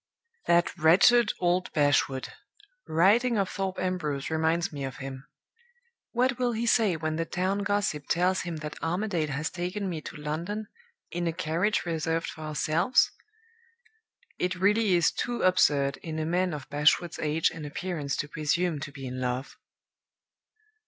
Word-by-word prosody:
"That 175 0 +3
wretched 210 +8 +6
old 180 +1 +1
Bashwood! 145 -3 +2 0.6
Writing 215 +9 +3
of 195 -2 +1
Thorpe 195 -1 -3
Ambrose 160 -7 -2
reminds 160 +1 +1
me 140 -1 -5
of 135 -1 -5
him. 135 +1 -8 0.8
What 250 +1 +1
will 245 -1 +1
he 230 +1 -2
say 225 -6 +3
when 155 0 -2
the 165 - -1
town 185 +4 -1
gossip 200 -7 -1
tells 180 +2 +2
him 170 -2 -5
that 150 - -7
Armadale 175 -1 -1
has 150 +2 -3
taken 185 +3 -3
me 165 -4 -4
to - - -9
London, 165 +8 -4 0.5
in 175 0 -2
a - - +1
carriage 170 +5 0
reserved 165 0 -1
for 155 - -9
ourselves? 155 +8 +2 1.3
It 180 +1 0
really 205 +1 +3
is 170 -2 +3
too 240 -1 -3
absurd 145 -7 +3
in 160 -2 -6
a 155 - -1
man 180 +2 +1
of 140 -3 -8
Bashwood's 150 +4 +2
age 155 +1 +1
and 160 - -8
appearance 150 -1 -3
to 145 - -3
presume 155 +2 0
to 145 - -6
be 135 -1 -8
in 130 0 -5
love!...." 125 +2 -3
170 Hz, 155 wpm, -28 LUFS, 150-185 Hz, 1.3 s, wretched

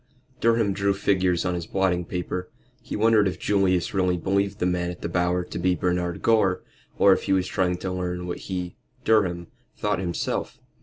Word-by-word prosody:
Durham 115 -3 +2
drew 100 0 +1
figures 95 -3 +1
on 90 - 0
his 85 -1 -4
blotting 90 -2 0
paper. 90 +1 -4 0.3
He - - -6
wondered 110 -1 +4
if 95 - -3
Julius 95 -3 +1
really 90 -2 +1
believed 100 +2 0
the - - -1
man 90 -1 0
at 90 - -8
the - - -1
Bower 90 +1 0
to 85 - -6
be 90 +1 +2
Bernard 90 0 -1
Gore, 100 -5 +3 0.3
or 100 - +6
if - - -2
he - - +2
was 95 -1 +2
trying 90 -2 0
to 95 +1 -4
learn 90 -1 -3
what 90 - -4
he 90 -2 -4 0.3
Durham 90 -6 +2 0.3
thought - - 0
himself. 85 -2 -3
90 Hz, 190 wpm, -25 LUFS, 90-95 Hz, 0.3 s, or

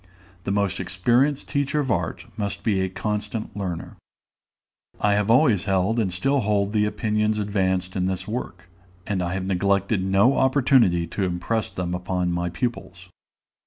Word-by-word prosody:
The - - -1
most 100 -2 0
experienced 120 +10 +1
teacher 140 +1 0
of 130 -4 -2
art - - -2
must 100 -1 -4
be 100 -4 +1
a 95 - 0
constant 105 +3 -4
learner. 90 -5 -5 1.0
I 105 0 +3
have 105 +1 +1
always 115 -5 +4
held 95 +4 +1
and 100 -5 0
still 135 +11 +1
hold 105 -2 0
the 105 -1 +3
opinions 105 0 0
advanced 95 -3 -1
in 95 -1 0
this 95 -1 -3
work, 110 -3 -5 0.4
and 100 -3 -1
I 90 +1 -2
have 95 -1 -3
neglected 100 +1 +1
no 95 +8 +3
opportunity 130 - +3
to 95 +4 -3
impress 95 +5 -1
them 90 -1 -4
upon 90 0 -1
my 85 0 -1
pupils. 95 -2 -5
100 Hz, 160 wpm, -24 LUFS, 95-110 Hz, 1.0 s, always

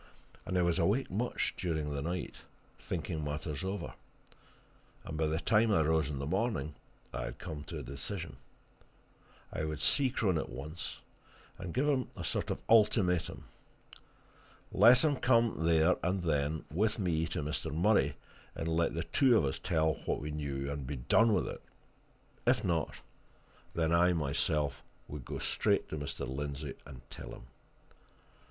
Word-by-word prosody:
And 90 - 0
I 90 - +4
was 85 +1 +2
awake 100 +9 +1
much 115 +6 -1
during 80 -4 -2
the 70 - -2
night, 85 +4 -3 0.4
thinking 80 -2 -3
matters 75 0 -3
over, 95 +2 -3 1.1
and 80 - -5
by 80 0 +1
the 80 +1 0
time 110 +3 +3
I 95 - +4
rose 80 -2 +2
in 70 - -3
the 70 - -3
morning 90 - -1 0.4
I - - -3
had 65 - -6
come 80 -5 -6
to - - -5
a - - -5
decision. 70 +1 -5 1.2
I 80 - -2
would 75 -1 -3
see 135 -2 +4
Crone 100 - +1
at - - -4
once, 75 +8 -6 0.6
and 95 -2 -5
give 135 - +1
him 135 -4 +1
a - - -4
sort - - -1
of - - -1
an - - -23
ultimatum. 105 -6 +3 1.3
Let 125 +1 +7
him 150 -3 +3
come, 115 -10 +3
there 80 +2 +5
and 90 +1 0
then, 75 -1 0
with 105 +7 +1
me 85 -5 0
to 75 - -3
Mr. 75 -1 -2
Murray, 80 -4 +3 0.4
and 80 - -3
let 80 -1 +1
the 85 - -1
two 130 +2 +4
of 80 - +2
us 65 - -1
tell 80 -3 +2
what - - 0
we 75 +1 -4
knew 70 -2 -3
and 70 -2 -4
be 75 - -3
done 110 - +4
with 95 -5 +2
it: - - -6 0.9
if - - +4
not, 80 -3 0 0.8
then 80 -1 +1
I 90 +1 +5
myself 75 -1 0 0.3
would 70 -4 -7
go - - -4
straight - - +1
to 80 - -4
Mr. 70 -2 -4
Lindsey 70 +2 -4
and 65 -4 -12
tell - - -8
him. - - -12
80 Hz, 170 wpm, -32 LUFS, 75-95 Hz, 1.3 s, Let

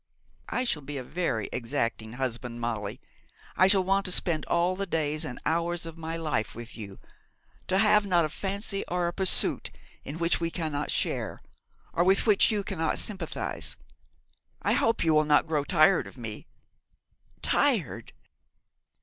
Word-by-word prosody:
I 250 - 0
shall 160 -12 0
be 145 +1 -6
a 130 - -4
very 130 - -2
exacting 115 -1 -2
husband, 125 -1 -3
Molly. 115 -1 -3 0.6
I 185 - +6
shall 195 -1 +5
want 195 +1 +2
to 185 - +2
spend 170 -3 +2
all 175 +2 +2
the 195 +1 -3
days 155 -2 -1
and 125 - -6
hours 170 +1 0
of 165 -1 -7
my 165 0 -5
life 155 -9 -1
with 115 0 -8
you; 100 -4 -8 0.7
to 185 - +2
have 210 +1 +5
not 175 -3 +3
a - - -3
fancy 195 +4 -3
or 180 0 0
a 170 - -2
pursuit 190 0 +1 0.3
in 145 - -6
which 170 0 +1
you 165 - 0
cannot 155 -4 -3
share, - - -1 0.5
or 175 - +3
with 190 +2 +3
which 210 -3 +5
you 210 -3 0
cannot 165 -5 -1
sympathise. 190 -6 -3 0.9
I - - +2
hope 225 0 +2
you 160 -1 +3
will 155 0 +5
not 150 -1 +4
grow 155 -3 0
tired 170 +3 +4
of - - -13
me!' 115 -3 -5 1.0
'Tired!' - - +1
165 Hz, 165 wpm, -28 LUFS, 135-185 Hz, 1.0 s, I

